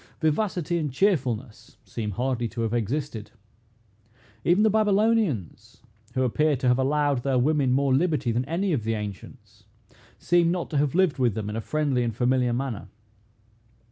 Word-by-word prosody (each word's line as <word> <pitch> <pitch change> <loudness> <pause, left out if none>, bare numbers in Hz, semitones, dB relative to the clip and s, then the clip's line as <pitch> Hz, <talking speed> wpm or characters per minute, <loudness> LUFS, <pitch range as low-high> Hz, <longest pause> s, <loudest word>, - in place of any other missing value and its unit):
Vivacity 175 +1 0
and 150 -4 -2
cheerfulness 130 - -1
seem 110 -2 -4
hardly 120 +2 -1
to 115 +1 -6
have 115 0 -1
existed. 120 0 -3 1.1
Even 180 +5 +3
the 220 - +5
Babylonians, 210 - 0 0.3
who 130 - +1
appear 150 +4 +2
to 130 0 -2
have 125 +1 +3
allowed 145 -1 +1
their 135 0 0
women 140 0 +2
more 135 +1 +2
liberty 150 -4 +1
than 120 +2 0
any 175 +5 -1
of 125 -7 -1
the 115 +1 -1
ancients, 105 -3 -9 0.5
seem 175 -1 +2
not 175 0 -2
to 150 - -1
have 145 +2 +1
lived 185 -6 +2
with 120 -5 +2
them 105 -1 -3
in - - -5
a 115 - -2
friendly 145 0 0
and 115 -3 -2
familiar 125 0 +1
manner. 120 -5 -3
135 Hz, 165 wpm, -25 LUFS, 120-160 Hz, 1.1 s, the